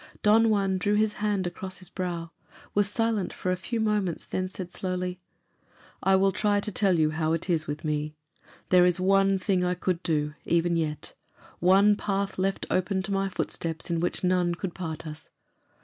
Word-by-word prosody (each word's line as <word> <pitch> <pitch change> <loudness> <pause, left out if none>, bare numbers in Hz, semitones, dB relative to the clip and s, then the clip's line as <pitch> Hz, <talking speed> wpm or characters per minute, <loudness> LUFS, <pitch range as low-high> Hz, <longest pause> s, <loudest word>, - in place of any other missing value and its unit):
Don 225 +2 +5
Juan 195 -3 +1
drew 205 +3 +1
his 215 0 +2
hand 205 -3 0
across 185 +2 -4
his 185 - -6
brow, 170 -3 -4 0.4
was 205 -1 +2
silent 225 -2 0
for 185 - -3
a - - +2
few 225 +6 -4
moments, 210 -6 0
then 185 0 -2
said 185 -2 -7
slowly, 180 -1 -3 0.8
"I 190 0 +4
will 195 +1 +4
try 205 0 +1
to 210 - -4
tell 190 -3 +2
you 155 -1 +3
how 160 0 0
it 165 +3 -1
is 155 -2 0
with 150 +3 -4
me. 150 0 -2 0.5
There 180 -1 +6
is 180 0 +1
one 195 +1 +3
thing 185 -1 +1
I 180 0 +1
could 180 0 -1
do, 150 -3 0
even 170 0 +1
yet; 155 -3 -3 0.5
one 195 +4 +5
path 200 -2 -2
left 195 +1 0
open 190 +1 0
to 200 - -5
my 195 0 0
footsteps 165 -2 -3
in 170 - +1
which 175 +2 -1
none 180 -1 +2
could 180 0 -5
part 165 -3 -5
us. 155 0 -8
185 Hz, 190 wpm, -27 LUFS, 170-195 Hz, 0.8 s, There